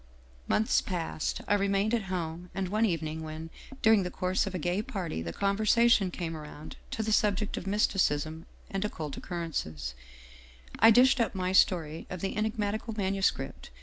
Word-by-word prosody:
" 65 0 -27
Months 220 - +3
passed. 170 -4 -3
I - - +3
remained 200 +2 +1
at 225 -4 +1
home, 175 -1 -4
and 190 -1 -2
one 215 +3 +2
evening 160 -3 -2
when, 160 +1 -7 0.3
during 220 -2 +6
the 180 - -2
course 185 +1 0
of 190 - -4
a - - 0
gay 175 +4 0
party, 180 - -4
the 85 0 -4
conversation 215 - +3
came 170 -2 -4
around 150 0 -9
to 220 - -2
the 220 - -1
subject 210 0 +2
of 190 - -6
mysticism 165 -5 +1 0.2
and 195 0 -1
occult 155 -8 -4
occur 175 -2 -4
rences, 75 - -4 0.9
I 225 - +8
dished 250 +4 +6
up 225 -4 0
my 185 -1 -1
story 165 -4 +2
of 180 -2 -6
the 195 - -2
enigmatical 215 +1 -2
manuscript. 195 -1 -1
190 Hz, 175 wpm, -29 LUFS, 160-210 Hz, 0.9 s, I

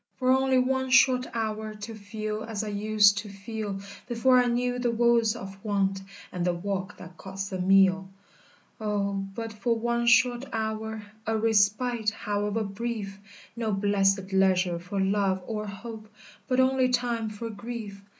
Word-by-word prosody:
For 255 -1 +2
only 265 0 +3
one 260 +1 +1
short 255 -1 +5
hour 215 -1 -3
To 210 +2 -7
feel 215 0 -5
as 220 -2 -3
I 215 - -4
used 205 0 +4
to 205 0 -7
feel, 200 0 -5 0.3
Before 250 +1 +4
I 245 - +3
knew 245 +1 0
the 245 -1 +1
woes 235 -1 +3
of 195 0 -9
want 195 -2 0 0.3
And 180 - -3
the 175 0 +1
walk 190 +2 -4
that 180 0 -12
costs 195 +1 -6
a 185 - -3
meal! 190 0 +4 0.7
"O 205 -2 -1 0.2
but 225 -1 -5
for 220 +3 0
one 235 +1 0
short 245 +2 +4
hour, 220 0 -3 0.2
A 225 0 +1
respite, 220 +1 +2
however 210 +1 -2
brief! 205 -1 -4 0.4
No 230 -2 -2
blessèd 195 -1 +1
leisure 185 -2 +3
for 185 +3 -4
love 190 -1 +1
or 215 -2 -4
hope, 215 +2 -8 0.4
But 255 -1 +1
only 260 0 +3
time 240 -3 0
for 225 +2 -6
grief! 210 -2 -7
215 Hz, 160 wpm, -27 LUFS, 200-235 Hz, 0.7 s, short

